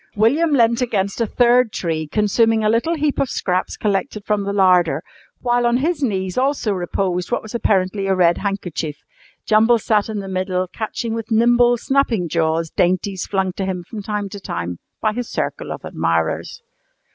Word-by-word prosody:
William 265 +11 +3
leant 235 -3 +3
against 200 -3 -1
a 230 - +1
third 245 0 +3
tree 160 -5 -2
consuming 220 +4 +2
a 215 - +3
little 235 +10 +1
heap 300 -2 -1
of 270 - +1
scraps 185 -1 -1
collected 210 +1 -2
from 210 -1 +1
the 200 - -2
larder, 180 -6 +3 0.4
while 240 -1 +2
on 235 +1 +2
his 310 +4 -1
knees 190 -5 -1
also 270 -4 0
reposed 180 0 -2
what 240 - 0
was 220 - -10
apparently 195 -3 0
a 190 - +2
red 175 -2 +3
handkerchief. 180 -6 -3 0.5
Jumble 225 +2 +4
sat 215 -1 +1
in 215 - -3
the 195 -1 -5
middle 185 -1 -1
catching 225 +3 -4
with 225 -1 -5
nimble, 240 +2 +4
snapping 235 -7 +1
jaws 160 0 0
dainties 185 +1 0
flung 190 -2 -1
to 195 - -4
him 185 -2 -3
from 210 +4 -8
time 205 0 -3
to 200 +1 -8
time 85 - -5 0.2
by 215 -1 +1
his 245 +1 -4
circle - - -3
of - - -7
admirers. 85 -1 -1
205 Hz, 180 wpm, -20 LUFS, 185-235 Hz, 0.5 s, Jumble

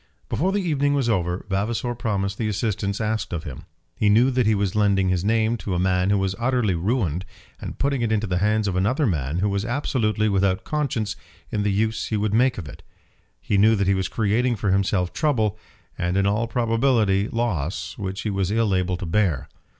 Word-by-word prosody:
Before 185 +6 0
the 200 0 0
evening 145 -4 +1
was 135 -4 0
over 90 -3 -1
Vavasor 110 +5 -1
promised 100 -4 -2
the 110 - 0
assistance 105 -1 -2
asked 110 -2 -2
of 85 -3 -3
him. 80 +2 -8 0.3
He 105 - +2
knew 120 +6 +5
that 125 -3 +1
he 110 - +4
was 100 -2 0
lending 100 -3 +2
his 90 -1 0
name 110 +2 +1
to 100 -4 -3
a - - 0
man 90 0 +1
who 100 - +3
was 95 -1 0
utterly 120 -4 +1
ruined, 90 - -1 0.4
and - - -7
putting 140 -2 0
it 115 -2 0
into 110 0 +1
the 90 -3 -1
hands 105 +1 +1
of 95 - -1
another 115 +11 +1
man 75 - -1
who 100 +3 +1
was 100 0 -1
absolutely 115 -4 0
without 95 -2 +1
conscience 120 -9 -2 0.4
in 105 - -1
the 105 0 +1
use 110 +2 0
he 110 - -1
would 105 0 -1
make 125 +3 +3
of 85 -7 -6
it. 70 - -11 0.6
He 100 - 0
knew 110 +2 +5
that 100 -1 0
he 100 - +3
was 95 -1 -1
creating 115 +3 +1
for 100 -2 -1
himself 95 -2 +1
trouble, 110 -9 0 0.4
and 90 +1 0
in 100 - +2
all 105 +4 +1
probability 115 -4 +2
loss, 100 -10 -2
which 95 0 -4
he 105 - -2
was 95 -1 -1
ill 110 -1 +1
able 90 -1 0
to 90 - -5
bear. 80 -6 0
105 Hz, 210 wpm, -23 LUFS, 95-115 Hz, 0.6 s, knew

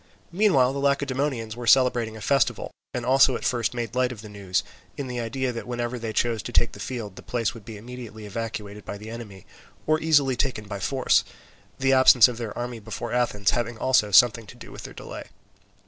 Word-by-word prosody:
Meanwhile 170 -10 +3
the 140 - -3
Lacedaemonians 140 -4 -1
were 120 -1 -7
celebrating 120 -2 +3
a - - -10
festival, 135 +4 +1 0.2
and 120 -1 -4
also 130 0 +5
at - - -5
first 120 -1 0
made 120 -2 -4
light 125 0 +1
of 110 -3 -9
the 105 - -9
news, 100 -3 -2 0.3
in 140 - -3
the 125 -1 -4
idea 125 +3 -2
that 115 0 -7
whenever 120 0 -3
they 115 -1 -4
chose 115 0 0
to - - -7
take 120 - +2
the - - -12
field 105 -3 -5
the - - -8
place 115 -5 -2
would 115 -4 -13
be 110 -2 -8
immediately 115 -1 -9
evacuated 105 -1 -6
by 100 - -6
the 105 +2 -9
enemy 105 -5 -9 0.4
or 155 0 +2
easily 145 -5 +3
taken 120 -5 -2
by 100 -1 -5
force; 130 +4 +2 0.5
the 135 0 +2
absence 130 -2 +8
of 120 -2 -6
their 115 -3 -5
army 120 -1 -4
before 115 +2 -6
Athens 110 -5 +1
having 120 -1 -2
also 125 -4 +2
something 110 +2 +5
to - - -12
do - - -12
with - - -9
their - - -10
delay. - - -8
120 Hz, 210 wpm, -25 LUFS, 110-130 Hz, 0.5 s, absence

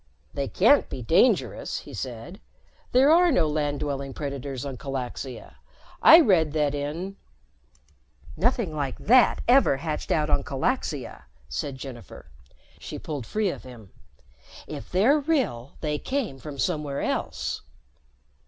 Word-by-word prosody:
"They - - -2
can't - - +4
be - - -6
dangerous," - - +2
he - - -12
said. - - -7 0.5
"There 265 +4 +5
are 345 +1 +5
no 175 - +3
land 150 -1 -1
dwelling 140 -2 -3
predators 140 -2 -5
on 135 -2 -5
Calaxia. 130 -1 -6 0.4
I 330 - +10
read 165 - +3
that 150 -2 +1
in 160 +7 -4 0.6
" - - -35 0.5
"Nothing 205 -3 0
like 140 -3 -3
that 245 +3 +4
ever 245 - +5
hatched 150 +1 -4
out 155 -2 +1
on 145 -2 +1
Calaxia," 140 - -3 0.2
said 65 - -4
Jennifer. 125 - -10 0.5
She - - -7
pulled 140 -7 -6
free 210 - 0
of - - -8
him. 120 -6 -13 0.7
"If 110 - -8
they're 230 +12 +4
real, 265 - -1
they 150 -2 -1
came 255 - -3
from 145 0 -8
somewhere 145 -1 -1
else." - - -2
150 Hz, 135 wpm, -25 LUFS, 135-195 Hz, 0.7 s, I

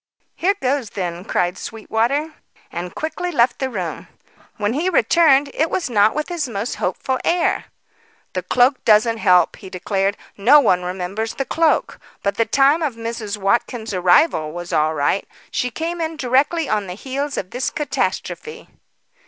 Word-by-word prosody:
"Here 390 +3 +1
goes 260 -3 -1
then!" 175 -3 -4
cried 180 +1 -1
Sweetwater, 235 +8 -1 0.4
and 175 +1 -6
quickly 355 +3 -3
left 245 -5 +2
the 265 - -1
room. 185 -8 -5 0.5
When 205 +1 0
he 325 +7 0
returned, 290 - +4
it 320 +2 +1
was 335 -9 -2
not 210 +1 +4
with 305 0 -2
his 330 -7 -2
most 215 +2 -3
hopeful 260 -1 -2
air. 345 0 +1 0.7
"The - - -1
cloak 255 +2 +2
doesn't 225 +1 +4
help," 180 -4 +4
he 190 - -11
declared. 195 +2 -1 0.2
"No 245 +9 +6
one 180 -10 +3
remembers 185 +5 -4
the 270 - -2
cloak. 325 +4 +1 0.2
But 200 - +1
the 230 - +3
time 280 +4 +4
of 290 -7 -1
Mrs. 230 -2 -4
Watkins' 220 +2 -1
arrival 180 - +3
was 175 +1 -7
all 155 +1 +2
right. 145 +6 0 0.2
She 250 - -1
came 335 +7 -4
in 320 0 -3
directly 280 +4 +1
on 210 -4 -1
the 180 - -6
heels 275 +5 -4
of 185 - -4
this 250 +2 -1
catastrophe." 300 - -3
235 Hz, 160 wpm, -20 LUFS, 195-290 Hz, 0.7 s, No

